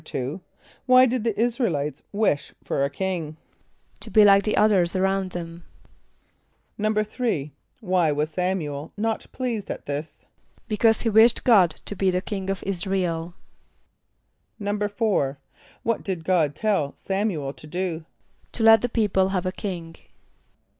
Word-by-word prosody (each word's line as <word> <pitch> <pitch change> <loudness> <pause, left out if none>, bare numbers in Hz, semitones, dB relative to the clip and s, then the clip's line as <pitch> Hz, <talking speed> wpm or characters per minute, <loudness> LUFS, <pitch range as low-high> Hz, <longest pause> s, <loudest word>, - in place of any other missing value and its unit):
= - - -14 0.8
Why 255 0 +7
did 250 -2 -1
the 230 -3 -1
[)I][s+]´ra 240 +1 +1
el 165 - -1
[=i]tes 145 +1 -3
wish 200 -8 0
for 140 - -1
a 140 - +1
king? 165 -1 -3 0.6
=To - - -8
be 215 -1 +6
like 200 -1 +7
the 215 - 0
others 195 -5 +3
around 190 0 0
them.= 170 0 -7 1.2
=3.= 215 - -1 0.3
Why 180 -6 +2
was 150 +2 -1
S[)a]m´u 180 -2 0
el 145 +1 -7
not 225 +1 -2
pleased 240 -5 -3
at - - -6
this? 145 +2 -5 0.5
=Because 220 +1 +2
he 230 - +1
wished 225 +2 +5
God 200 -8 +6 0.2
to 205 - -4
be 195 -1 +1
the 180 0 +1
king 195 0 -5
of 195 - -3
[)I][s+]´ra 190 0 -1
el.= 165 0 -3 1.2
=4.= 205 - 0 0.5
What 230 -1 0
did 185 -4 -4
God 160 -6 +2
tell 195 -8 0
S[)a]m´u 195 -6 -2
el 135 - -4
to 155 - -12
do? 170 -1 -3 0.5
=To 230 - -1
let 225 -1 +7
the 245 - 0
people 200 -5 +1
have 185 -2 -1
a 185 - 0
king. 175 -5 -6
190 Hz, 155 wpm, -24 LUFS, 165-215 Hz, 1.2 s, Why